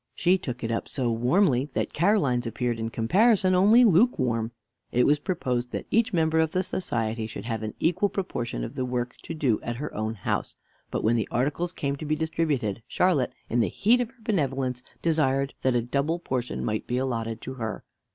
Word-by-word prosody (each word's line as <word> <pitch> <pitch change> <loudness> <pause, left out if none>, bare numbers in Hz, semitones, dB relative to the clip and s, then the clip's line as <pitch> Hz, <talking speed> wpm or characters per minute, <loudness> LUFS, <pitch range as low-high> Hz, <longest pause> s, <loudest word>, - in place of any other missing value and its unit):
She 180 +2 +3
took 125 -6 -6
it 115 - -1
up 115 - -2
so 125 -4 -1
warmly 130 - +2
that - - -1
Caroline's 145 - +2
appeared, 120 +1 -2
in 115 0 -2
comparison, 185 - +3
only 210 +7 +6
lukewarm. 135 - +3 0.4
It 125 - +3
was 150 0 +4
proposed 125 -9 -2
that - - -3
each 230 +1 +3
member 160 -3 +2
of 160 -1 +1
the 185 - +1
society 115 -11 -2
should 105 -1 -7
have 115 -2 -3
an 110 -1 -5
equal 180 +5 +2
proportion 120 - -3
of - - -5
the 130 - -2
work 125 -1 -2
to 165 - -6
do 130 -8 +1
at 120 - -4
her 150 +5 -5
own 110 +1 -2
house; 95 - -2 0.3
but - - -2
when 115 +2 +3
the 110 - -1
articles 145 +8 -1
came 140 -5 -2
to 155 - -6
be 155 +1 +1
distributed, 150 -9 -1
Charlotte, 160 -8 +2 0.2
in 120 - 0
the 110 -6 +2
heat 235 - +3
of 240 - -2
her 260 -2 -25
benevolence, 135 - -1 0.2
desired 140 -4 +1
that 130 -1 +2
a 120 - +2
double 140 +7 0
portion 130 -7 -3
might 110 0 -2
be 125 - -1
allotted 115 -4 -2
to 130 - -6
her. 110 -4 -5
130 Hz, 200 wpm, -26 LUFS, 120-170 Hz, 0.4 s, only